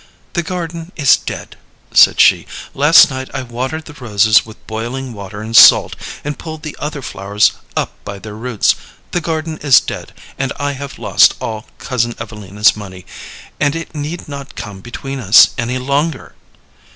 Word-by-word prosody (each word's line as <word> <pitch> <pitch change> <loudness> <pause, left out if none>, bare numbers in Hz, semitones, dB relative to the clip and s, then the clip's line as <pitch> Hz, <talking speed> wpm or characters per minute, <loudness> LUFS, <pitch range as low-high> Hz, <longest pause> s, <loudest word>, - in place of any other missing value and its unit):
"The 170 - 0
garden 170 -1 -5
is 140 -5 +5
dead," - - -7 0.3
said - - +6
she. - - +5 0.3
"Last 150 +2 +6
night 130 0 -5
I 130 - -3
watered 130 +6 -4
the 150 - -11
roses 110 -5 +3
with 110 - -15
boiling 120 +4 -5
water 100 0 -8
and 115 +1 -5
salt, - - +7 0.3
and 150 - -3
I - - -19
pulled 160 -1 -8
the 155 - -6
other 150 -2 -5
flowers 100 +1 +1 0.3
up - - -1
by 100 -1 -7
their 105 +1 -9
roots. 115 0 +1 0.4
The 175 - -1
garden 160 -1 -3
is 140 -4 +6
dead, - - -7 0.3
and 135 -1 -1
I 145 0 -1
have 140 0 -8
lost - - +4
all 110 +1 -5
Cousin 120 -2 -2
Evelina's 105 -2 0
money, 95 -3 -10 0.5
and 145 +1 +1
it 165 0 -6
need 155 +3 -5
not 140 -1 -8
come 100 -2 -8
between 135 +4 -6
us 105 -2 +6
any 120 +2 -1
longer." 140 +3 -2
130 Hz, 170 wpm, -16 LUFS, 110-150 Hz, 0.5 s, salt